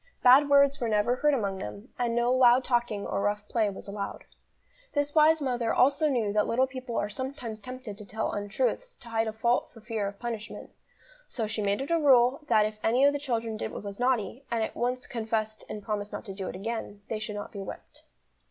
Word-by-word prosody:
Bad 270 +3 +7
words 280 0 +5
were 235 - 0
never 215 +4 +2
heard 295 +1 +3
among 200 -6 -2
them, 105 - -7
and 235 -1 0
no 240 +1 +2
loud 255 0 +6
talking 240 -5 0
or - - -2
rough 205 +1 -1
play 220 -2 +1
was 195 - -9
allowed. 200 0 -5 0.7
This 290 0 0
wise 315 0 +5
mother 245 -3 0
also 280 +4 +3
knew 225 -7 0
that 210 0 +2
little 255 +3 +3
people 255 -2 -6
are 205 - 0
sometimes 245 -1 -6
tempted 250 -3 -8
to 210 - -9
tell 220 +2 -2
untruths - - -2
to 235 - -13
hide 225 0 0
a - - -1
fault 235 +3 +1
for 230 - -14
fear 220 -2 -3
of 200 0 -7
punishment, 230 -2 -6 0.6
so 230 - -3
she 215 0 -3
made 200 +3 0
it 275 - -4
a 335 - +3
rule 260 -2 +5
that 215 -6 +4
if 215 0 -5
any 245 +5 +4
of 285 - +5
the 285 - -2
children 230 -5 -2
did - - -4
what - - -7
was 200 +1 -7
naughty, 250 0 0
and 230 -1 0
at - - -4
once 250 +1 -1
confessed 220 -3 -3
and 210 - -6
promised 210 -1 -3
not - - -6
to 195 - -6
do 190 -1 -5
it - - -5
again, 205 0 -5
they 220 - -2
should 215 -1 -5
not 205 - -6
be 200 - -7
whipped. 195 - -9
230 Hz, 225 wpm, -28 LUFS, 210-255 Hz, 0.7 s, Bad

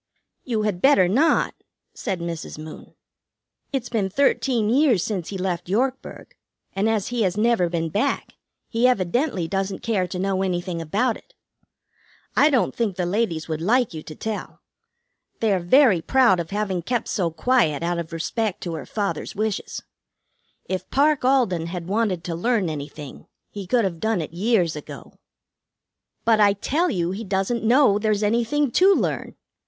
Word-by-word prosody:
"You 225 -4 -1
had 200 -4 -2
better 235 -10 +5
not," 275 - +2 0.4
said 190 -6 -4
Mrs. 170 -2 -5
Moon. 155 0 -10 0.8
"It's 265 -4 -2
been 210 -5 0
thirteen 250 -1 +1
years 245 - +3
since 190 -6 -3
he 195 - -4
left 180 -2 -3
Yorkburg, 255 +6 -2 0.4
and, 200 +3 +1
as 215 -3 0
he 240 -1 -1
has 190 -1 0
never 215 -5 +2
been 165 -1 -2
back, 220 - -1 0.3
he 235 +2 +2
evidently 205 - 0
doesn't 195 +1 -3
care 200 -6 0
to 180 - -5
know 190 0 0
anything 175 -2 -2
about 210 +10 0
it. - - -23 1.0
I 295 - +5
don't 265 -5 +1
think 220 -6 -1
the 180 - -1
ladies 175 -4 -1
would 160 -1 -3
like 235 +3 +2
you 155 - -6
to 155 - -10
tell. 220 +3 -6 0.8
They 220 -3 +2
are 190 - +1
very 190 - +4
proud 240 -2 +3
of 165 - -4
having 195 -3 -2
kept 235 +6 -2
so 180 -5 0
quiet 165 - +1
out 170 0 -1
of 165 -1 -6
respect 185 +5 -2
to 170 - -4
her 155 - -6
father's 205 -1 -3
wishes. 215 0 -3 0.8
If 185 -1 -4
Parke 290 0 +2
Alden 225 -11 +2
had 175 -1 -5
wanted 195 -2 -1
to 170 - -4
learn 200 +1 0
anything, 145 -1 -8 0.2
he 200 -3 -7
could 240 +3 +2
have 170 -4 -3
done 220 -1 0
it 160 0 -5
years 185 -3 +1
ago." 150 - -10 1.1
"But 225 -2 +4
I 205 -1 +5
tell 300 - 0
you 175 -2 -1
he 200 +4 -5
doesn't 195 +4 -1
know 235 -3 +4
there's 215 -1 0
anything 235 +6 +1
to 380 - +5
learn." - - -2
200 Hz, 170 wpm, -23 LUFS, 175-235 Hz, 1.1 s, better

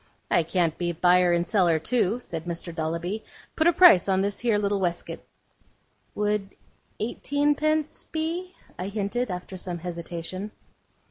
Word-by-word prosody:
'I - - +5
can't 170 -3 +1
be 175 -1 -1
buyer 180 +1 +4
and 170 0 +2
seller 180 -6 +3
too,' 225 +5 +1
said 165 -8 -7
Mr. 170 0 -4
Dolloby. 170 +6 -3 0.3
'Put 315 - +3
a - - +7
price 335 - +7
on 190 0 +3
this 200 0 -1
here 230 -3 +2
little 205 -1 0
weskit.' 175 -2 -3 0.9
'Would 210 -1 -1 0.4
eighteenpence 295 +6 0
be?' 340 +3 -3 0.2
I 180 - -3
hinted, 210 +4 -2
after 180 +1 -6
some 180 -1 -4
hesitation. 175 +3 -5
195 Hz, 140 wpm, -26 LUFS, 175-240 Hz, 0.9 s, a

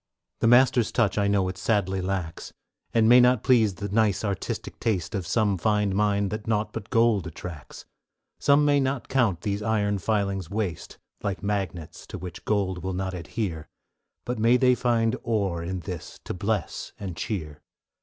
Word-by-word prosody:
The - - +2
Master's 120 -1 +5
touch 110 -3 +1
I 100 - +2
know 100 -2 +2
it 95 0 -5
sadly 95 -1 0
lacks, 90 -3 -4 0.4
And 115 -1 +3
may 120 +2 +8
not 125 -2 +4
please 110 -7 +4
the 100 - -4
nice 105 0 +1
artistic 100 -2 -4
taste 95 -6 -1
Of 95 -5 -3
some 100 -2 +1
fine 105 -1 +1
mind 100 -1 +1
that 105 0 -5
naught 105 -1 0
but 110 -1 -6
gold 115 -6 +3
attracts; 80 -2 -9 0.5
Some 145 +1 +4
may 145 -1 +4
not 135 -1 -2
count 110 -10 +1
these 100 0 -2
iron 105 -2 0
filings 100 -4 -1
waste; 100 -5 -4 0.2
Like 100 -1 -3
magnets, 95 -6 -3
to - - -7
which 90 -2 -8
gold 95 -4 0
will 95 0 -2
not 95 +1 -3
adhere, 85 -2 -4 0.6
May 120 0 +3
they 125 -1 +4
find 120 -1 +1
ore 100 -7 -1
in 90 +2 -4
this 90 -3 -7
to - - -5
bless 100 -1 -3
and 95 -4 -5
cheer. 80 -6 -4
100 Hz, 170 wpm, -26 LUFS, 95-115 Hz, 0.6 s, may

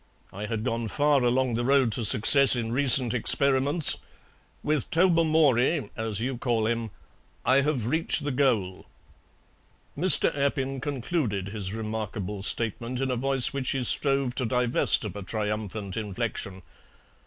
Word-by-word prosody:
I 105 +2 -6
had 110 -1 -4
gone 115 -2 -3
far 145 +3 +1
along 125 0 0
the 120 +1 -2
road 135 -2 +2
to 115 - -3
success 130 +6 +6
in 115 -2 -4
recent 130 -2 +3
experiments; 140 +5 +2 0.7
with 150 -3 -2
Tobermory, 160 -5 +2
as 110 -3 -4
you 125 +1 -4
call 120 -4 -1
him, 115 0 -2 0.6
I 130 +2 +3
have 140 -6 -2
reached 160 +3 0
the 145 - -3
goal." 115 -9 -1 1.1
Mr. 175 0 +4
Appin 135 -1 -2
concluded 130 - -3
his 100 -2 -5
remarkable 105 -2 -5
statement 115 +4 -2
in 135 -1 -2
a - - -1
voice 135 +1 +2
which 135 -2 -2
he 135 -2 -2
strove 135 0 0
to 130 - -3
divest 125 0 +1
of - - -7
a 100 - -7
triumphant 105 -1 -5
inflection. 100 -3 -5
125 Hz, 140 wpm, -25 LUFS, 110-140 Hz, 1.1 s, success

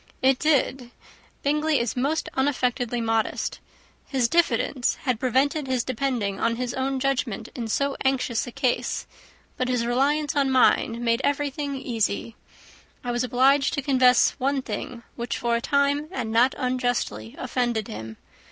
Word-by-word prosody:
"It 265 -1 +4
did. 270 -4 +1 0.5
Bingley 300 +1 +2
is 235 -1 -1
most 285 +6 0
unaffectedly 250 -3 0
modest. 225 -1 -1 0.5
His 260 -4 +1
diffidence 265 -5 +1
had 255 -5 0
prevented 270 +4 +1
his 255 -2 0
depending 235 -6 -2
on 230 0 +1
his 245 0 -3
own 265 0 -1
judgment 260 -5 -1
in 235 -3 -4
so 280 +5 0
anxious 260 -4 0
a - - -6
case, 255 -1 -1 0.5
but 255 - 0
his 250 -2 0
reliance 280 +5 +1
on 280 -2 +2
mine 240 -2 +3
made 230 +1 +2
everything 285 0 -1
easy. 230 -3 -2 0.7
I 245 - -2
was 240 +1 0
obliged 265 +3 +3
to 280 - -2
confess 255 -3 +5
one 270 0 0
thing, 235 +1 -6
which 235 0 -3
for 235 -1 0
a 235 - -1
time, 280 +3 +1
and 235 -9 -3
not 240 +4 +4
unjustly, 245 - -2
offended 240 -4 -1
him. 110 +1 -7
255 Hz, 150 wpm, -25 LUFS, 235-275 Hz, 0.7 s, confess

